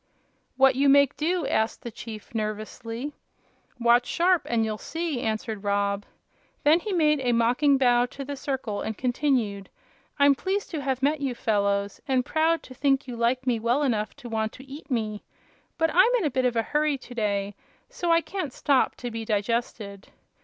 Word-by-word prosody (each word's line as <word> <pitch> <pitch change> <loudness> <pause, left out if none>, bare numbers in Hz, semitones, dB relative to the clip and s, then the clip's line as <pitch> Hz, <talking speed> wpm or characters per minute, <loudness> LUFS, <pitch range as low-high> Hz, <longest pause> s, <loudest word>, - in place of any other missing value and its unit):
"What 270 0 +6
you 275 +2 +3
make 280 0 +5
do?" 335 +1 0
asked 220 -3 0
the 235 - -6
chief, 220 -1 -9
nervously. 225 +5 -4 0.7
"Watch 240 +1 +4
sharp, 355 0 +2
and 230 -2 +2
you'll 215 -1 -3
see," 325 -6 -3
answered 220 -2 -3
Rob. 200 0 0 0.6
Then 310 +3 +5
he 420 +4 -5
made 305 -5 +3
a 250 -2 +1
mocking 250 +5 +3
bow 245 -2 +3
to 275 +2 -8
the 285 +1 -5
circle 265 -6 -3
and 220 - -4
continued: 245 -6 0 0.5
"I'm 285 -1 +6
pleased 380 +10 -3
to 310 -4 -3
have 265 -1 -2
met 290 +1 +2
you 265 -3 -1
fellows, 200 -3 0
and 260 -2 +1
proud 320 +1 +1
to 255 - -11
think 270 +1 +1
you 245 - -5
like 240 +3 0
me 245 -3 +1
well 240 +6 +1
enough 220 -6 -1
to 280 -4 -10
want 220 -1 -2
to 265 - -12
eat 285 +4 -10
me; 215 -5 -2 0.5
but 325 -1 +2
I'm 370 +8 +6
in 420 - -1
a 295 - 0
bit 260 0 0
of 245 -1 +1
a 225 - +2
hurry 300 +3 0
to 255 - -12
day, 205 -3 -1 0.3
so 345 -1 -2
I 335 0 +5
can't 350 -7 -5
stop 275 -3 +2
to 245 -1 -6
be 225 0 -4
digested." 210 -2 -2
250 Hz, 190 wpm, -26 LUFS, 220-285 Hz, 0.7 s, What